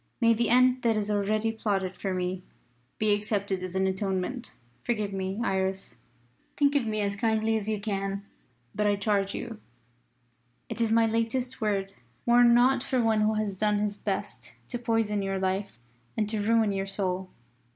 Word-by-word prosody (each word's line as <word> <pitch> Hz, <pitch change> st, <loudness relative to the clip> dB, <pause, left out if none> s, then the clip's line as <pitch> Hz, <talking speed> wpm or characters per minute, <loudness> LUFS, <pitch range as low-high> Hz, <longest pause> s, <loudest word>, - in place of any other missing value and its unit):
May 230 Hz, -2 st, +5 dB
the 230 Hz, 0 st, 0 dB
end 255 Hz, +1 st, +4 dB
that 230 Hz, -2 st, +2 dB
is 210 Hz, 0 st, -1 dB
already 210 Hz, +2 st, +1 dB
plotted 200 Hz, -4 st, -1 dB
for 190 Hz, +1 st, -4 dB
me 185 Hz, 0 st, -2 dB, 0.6 s
be 215 Hz, -1 st, +3 dB
accepted 200 Hz, -2 st, -1 dB
as 185 Hz, 0 st, -6 dB
an 190 Hz, 0 st, +2 dB
atonement! 190 Hz, +5 st, -2 dB, 0.3 s
Forgive 215 Hz, -4 st, -1 dB
me, 190 Hz, +1 st, -3 dB
Iris! 190 Hz, -, -1 dB, 0.6 s
Think 285 Hz, -1 st, +3 dB
of 275 Hz, -6 st, +1 dB
me 215 Hz, -1 st, 0 dB
as 200 Hz, -1 st, -1 dB
kindly 220 Hz, 0 st, +1 dB
as 215 Hz, -1 st, -2 dB
you 215 Hz, -1 st, -1 dB
can. 195 Hz, -1 st, -3 dB, 0.5 s
But 210 Hz, 0 st, +1 dB
I 205 Hz, -, +3 dB
charge 200 Hz, -1 st, 0 dB
you 230 Hz, -3 st, -6 dB, 1.1 s
it -, -, -3 dB
is 225 Hz, -1 st, +2 dB
my 225 Hz, 0 st, +5 dB
latest 230 Hz, +3 st, -1 dB
word 195 Hz, -2 st, -1 dB, 0.3 s
mourn 240 Hz, 0 st, +6 dB
not 255 Hz, +2 st, +4 dB
for 265 Hz, -1 st, -1 dB
one 225 Hz, -2 st, +3 dB
who 215 Hz, +1 st, +2 dB
has 210 Hz, -2 st, -1 dB
done 210 Hz, +1 st, +1 dB
his 205 Hz, 0 st, -1 dB
best -, -, -5 dB
to 240 Hz, -, -3 dB
poison 225 Hz, -3 st, 0 dB
your 195 Hz, 0 st, -1 dB
life 190 Hz, -1 st, -2 dB, 0.4 s
and 215 Hz, -, +1 dB
to 215 Hz, -1 st, -1 dB
ruin 220 Hz, 0 st, +3 dB
your 195 Hz, 0 st, -2 dB
soul." 190 Hz, -1 st, -2 dB
210 Hz, 175 wpm, -28 LUFS, 195-225 Hz, 1.1 s, mourn